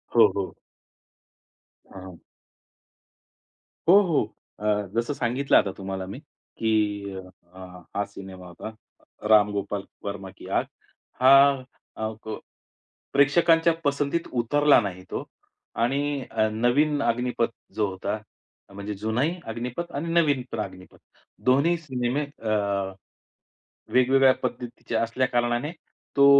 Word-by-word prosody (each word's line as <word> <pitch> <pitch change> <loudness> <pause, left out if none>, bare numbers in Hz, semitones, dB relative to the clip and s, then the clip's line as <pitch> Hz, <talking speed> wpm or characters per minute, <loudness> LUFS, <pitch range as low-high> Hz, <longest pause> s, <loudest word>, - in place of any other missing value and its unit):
हो, - - +8
हो. - - -2 1.4
हं, 95 - -10
हं. 90 -2 -10 1.7
हो, 195 +3 +9
हो. 170 -7 +2 0.4
अ, 105 -1 0
जसं 120 +5 0
सांगितलं 130 +2 +2
आता 100 - +2
तुम्हाला 95 -1 -4
मी, 100 +7 -7 0.4
की 105 -3 0
अ, 95 -1 -8 0.7
हा 100 - +1
सिनेमा 95 -2 -10
होता, 110 +5 -9 0.5
राम 105 -1 +6
गोपाल 100 0 -3 0.2
वर्मा 100 -1 -5
की, - - -12
"आग." - - +1 0.6
हा 135 0 +7 0.3
अ, 110 - -2 0.2
प 110 0 -4 0.8
प्रेक्षकांच्या 165 +4 +5
पसंतीत 145 +3 0
उतरला 145 +3 +5
नाही 95 -3 -5
तो - - -3 0.6
आणि 140 +3 0
अ, 110 -1 +2
नवीन 140 +7 +2
अग्निपथ 120 0 0 0.2
जो 105 -2 +1
होता 95 +3 -3 0.6
म्हणजे 100 +1 -5
जुनाही 115 - 0
अग्निपथ 125 +9 -4
आणि 150 +4 -3
नवीन 150 -6 +3
पण 115 - -4
अग्निपथ 95 -3 -7 0.5
दोन्ही 140 +7 +4
सिनेमे 130 -2 -2 0.2
अ, 110 - -1 1.4
वेगवेगळ्या 130 +1 +5
पद्धतीच्या 120 -2 -3
असल्या 120 +3 +1
कारणाने 120 +5 0 0.4
तो 140 0 +7
120 Hz, 115 wpm, -25 LUFS, 105-140 Hz, 1.7 s, हो